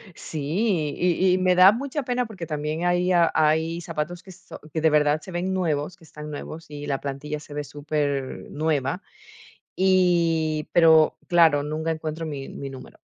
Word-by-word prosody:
Sí, 155 Hz, +1 st, -1 dB
y 180 Hz, +1 st, +2 dB
y -, -, +1 dB
me 185 Hz, 0 st, +3 dB
da 185 Hz, +3 st, +8 dB
mucha 275 Hz, +4 st, -3 dB
pena, 245 Hz, -1 st, -1 dB
porque 190 Hz, -7 st, -8 dB
también 150 Hz, +2 st, -3 dB
hay 175 Hz, +1 st, +2 dB, 0.2 s
hay 160 Hz, +2 st, +2 dB
zapatos 165 Hz, +1 st, -4 dB
que 190 Hz, -, -13 dB
son 185 Hz, -, -12 dB
que 160 Hz, -, -1 dB
de 160 Hz, 0 st, +4 dB
verdad 150 Hz, 0 st, +3 dB
se 185 Hz, -, -11 dB
ven 180 Hz, +2 st, -2 dB
nuevos, 170 Hz, -2 st, -1 dB
que 165 Hz, -, -20 dB
están 150 Hz, -1 st, -9 dB
nuevos, 160 Hz, +2 st, -7 dB
y 145 Hz, 0 st, -7 dB
la 135 Hz, -2 st, -2 dB
plantilla 145 Hz, +2 st, -5 dB
se 145 Hz, 0 st, -12 dB
ve 150 Hz, 0 st, -3 dB
supernueva. 145 Hz, +1 st, -2 dB, 0.7 s
Y, 170 Hz, -5 st, +2 dB
pero 160 Hz, -2 st, +5 dB
claro, 160 Hz, -5 st, +4 dB
nunca 155 Hz, +2 st, -2 dB
encuentro 160 Hz, 0 st, -4 dB
mi 140 Hz, -3 st, -5 dB
mi 140 Hz, -1 st, -7 dB
número, 130 Hz, -1 st, -12 dB
160 Hz, 170 wpm, -24 LUFS, 150-175 Hz, 0.7 s, da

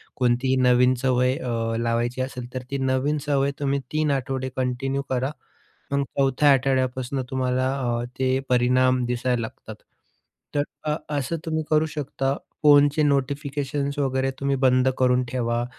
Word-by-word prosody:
कोणतीही 125 Hz, +1 st, +1 dB
नवीन 125 Hz, 0 st, +4 dB
सवय 125 Hz, 0 st, +2 dB
अ, 115 Hz, -2 st, -2 dB
लावायची 120 Hz, +2 st, -1 dB
असेल, 125 Hz, -1 st, -6 dB
तर 130 Hz, 0 st, -4 dB
ती 140 Hz, -, -1 dB
नवीन 130 Hz, +3 st, +1 dB
सवय 140 Hz, -1 st, +1 dB
तुम्ही 140 Hz, -1 st, 0 dB
3 155 Hz, -1 st, +1 dB
आठवडे 130 Hz, -1 st, -2 dB
कंटिन्यू 130 Hz, +2 st, -1 dB
करा. 130 Hz, +2 st, 0 dB, 0.6 s
मग 140 Hz, 0 st, +1 dB
4थ्या 140 Hz, +2 st, +3 dB
आठवड्यापासून 130 Hz, 0 st, 0 dB
तुम्हाला 130 Hz, 0 st, 0 dB
अ, 120 Hz, -1 st, -1 dB
ते 130 Hz, 0 st, +1 dB
परिणाम 125 Hz, 0 st, +3 dB
दिसायला 125 Hz, 0 st, 0 dB
लागतात. 110 Hz, -, -7 dB, 0.8 s
तर 145 Hz, -, +2 dB, 0.3 s
अ, -, -, +2 dB, 0.2 s
असं 140 Hz, +5 st, -2 dB
तुम्ही 160 Hz, 0 st, -1 dB
करू 155 Hz, 0 st, +3 dB
शकता, 135 Hz, -1 st, -1 dB, 0.3 s
फोनचे 145 Hz, 0 st, +5 dB
नोटिफिकेशन्स 140 Hz, 0 st, -1 dB
वगैरे 135 Hz, -1 st, 0 dB
तुम्ही 140 Hz, 0 st, +1 dB
बंद 130 Hz, 0 st, +4 dB
करून 125 Hz, 0 st, +3 dB
ठेवा 120 Hz, -1 st, -1 dB
130 Hz, 140 wpm, -24 LUFS, 125-140 Hz, 0.8 s, फोनचे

